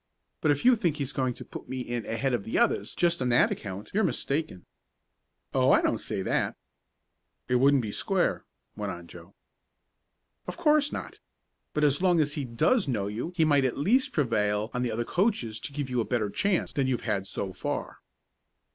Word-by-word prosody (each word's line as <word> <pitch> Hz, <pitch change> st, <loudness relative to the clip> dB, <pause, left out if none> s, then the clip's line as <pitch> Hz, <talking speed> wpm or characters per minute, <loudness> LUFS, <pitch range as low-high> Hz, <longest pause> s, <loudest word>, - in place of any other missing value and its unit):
But 155 Hz, -, +2 dB
if 145 Hz, -, +1 dB
you 255 Hz, 0 st, +7 dB
think 170 Hz, -8 st, 0 dB
he's 140 Hz, -2 st, -3 dB
going 130 Hz, -3 st, -1 dB
to -, -, -10 dB
put -, -, -10 dB
me 130 Hz, 0 st, -3 dB
in 120 Hz, -2 st, -4 dB
ahead 130 Hz, +3 st, -1 dB
of 120 Hz, -, 0 dB
the 110 Hz, -, -2 dB
others 235 Hz, -1 st, +1 dB
just 170 Hz, -4 st, +1 dB
on 125 Hz, -, +1 dB
that 120 Hz, -, +4 dB
account 100 Hz, 0 st, -6 dB
you're 215 Hz, +3 st, +2 dB
mistaken." 150 Hz, -, -2 dB, 0.9 s
"Oh, -, -, +3 dB
I -, -, +6 dB
don't -, -, +1 dB
say -, -, -3 dB
that." -, -, 0 dB, 0.9 s
"It 125 Hz, -, +3 dB
wouldn't 135 Hz, 0 st, +4 dB
be 105 Hz, -, -3 dB
square," 190 Hz, -, 0 dB, 0.3 s
went -, -, -3 dB
on -, -, -8 dB
Joe. -, -, -13 dB, 1.1 s
"Of -, -, -5 dB
course 305 Hz, -3 st, +3 dB
not. -, -, -6 dB, 0.6 s
But 150 Hz, -, +1 dB
as 145 Hz, +2 st, +3 dB
long 180 Hz, -3 st, +4 dB
as 145 Hz, -1 st, +2 dB
he 145 Hz, -2 st, -3 dB
does 150 Hz, -, +2 dB
know 110 Hz, -7 st, -1 dB
you 110 Hz, -, -4 dB
he 165 Hz, -3 st, +3 dB
might 145 Hz, -3 st, +4 dB
at 130 Hz, -, 0 dB
least 230 Hz, -, +2 dB
prevail 110 Hz, -6 st, 0 dB
on 125 Hz, -, -1 dB
the 125 Hz, -2 st, 0 dB
other 120 Hz, +2 st, -2 dB
coaches 175 Hz, -, 0 dB
to 140 Hz, -, -6 dB
give 145 Hz, -1 st, -3 dB
you 125 Hz, -2 st, 0 dB
a -, -, 0 dB
better 110 Hz, -4 st, -1 dB
chance 200 Hz, -, 0 dB
than 135 Hz, -2 st, 0 dB
you've 125 Hz, -3 st, 0 dB
had 100 Hz, -3 st, -2 dB
so 95 Hz, -1 st, -4 dB
far." 90 Hz, -, -4 dB
135 Hz, 200 wpm, -28 LUFS, 115-165 Hz, 1.1 s, you